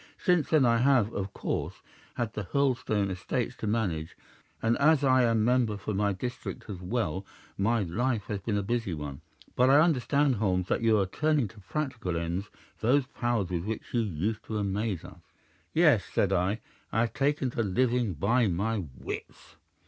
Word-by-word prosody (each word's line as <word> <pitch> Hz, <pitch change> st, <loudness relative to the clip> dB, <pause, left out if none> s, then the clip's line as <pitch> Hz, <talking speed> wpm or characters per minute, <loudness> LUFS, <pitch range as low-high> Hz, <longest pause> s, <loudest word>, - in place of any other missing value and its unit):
Since 180 Hz, -5 st, +2 dB
then 155 Hz, -5 st, +4 dB
I 115 Hz, -1 st, +4 dB
have 120 Hz, -3 st, +3 dB
of 100 Hz, 0 st, -3 dB
course -, -, -4 dB, 0.3 s
had 115 Hz, -3 st, -2 dB
the 105 Hz, -, -4 dB
Hurlstone 115 Hz, -5 st, +1 dB
estates 90 Hz, -1 st, -2 dB
to -, -, -4 dB
manage, 95 Hz, -8 st, -1 dB, 0.4 s
and 115 Hz, +1 st, +2 dB
as 150 Hz, 0 st, +4 dB
I 130 Hz, -2 st, +5 dB
am 115 Hz, -2 st, +2 dB
member 120 Hz, -4 st, +2 dB
for 100 Hz, +2 st, -4 dB
my 100 Hz, +1 st, +1 dB
district 120 Hz, +6 st, -5 dB
as 90 Hz, -3 st, -7 dB
well, 95 Hz, -2 st, -2 dB, 0.3 s
my 110 Hz, +2 st, +1 dB
life 110 Hz, +5 st, -1 dB
has 105 Hz, 0 st, -4 dB
been 105 Hz, +1 st, -1 dB
a 100 Hz, -, -1 dB
busy 115 Hz, -4 st, -1 dB
one. 75 Hz, -1 st, -6 dB, 0.3 s
But 125 Hz, +1 st, +4 dB
I 140 Hz, +2 st, +7 dB
understand, 145 Hz, -4 st, +3 dB
Holmes, 95 Hz, -3 st, 0 dB
that -, -, +1 dB
you 115 Hz, -1 st, +4 dB
are 100 Hz, -, +2 dB
turning 150 Hz, +5 st, +1 dB
to 105 Hz, -, -15 dB
practical 110 Hz, -, -3 dB
ends 85 Hz, +4 st, -3 dB, 0.3 s
those 130 Hz, +4 st, +3 dB
powers 120 Hz, -7 st, -1 dB
with 85 Hz, 0 st, -2 dB
which 110 Hz, +1 st, -5 dB
you 120 Hz, -, +3 dB
used 105 Hz, +2 st, -2 dB
to 110 Hz, -, -3 dB
amaze 100 Hz, -2 st, -2 dB
us?' -, -, -12 dB, 0.5 s
"'Yes,' -, -, +4 dB
said 100 Hz, -1 st, +2 dB
I, 95 Hz, +4 st, 0 dB, 0.3 s
'I -, -, +1 dB
have 115 Hz, -1 st, 0 dB
taken 140 Hz, -2 st, 0 dB
to 120 Hz, -, -1 dB
living 115 Hz, +1 st, +1 dB
by 115 Hz, -, +2 dB
my 100 Hz, +3 st, -1 dB
wits. -, -, -8 dB
110 Hz, 180 wpm, -29 LUFS, 95-125 Hz, 0.5 s, I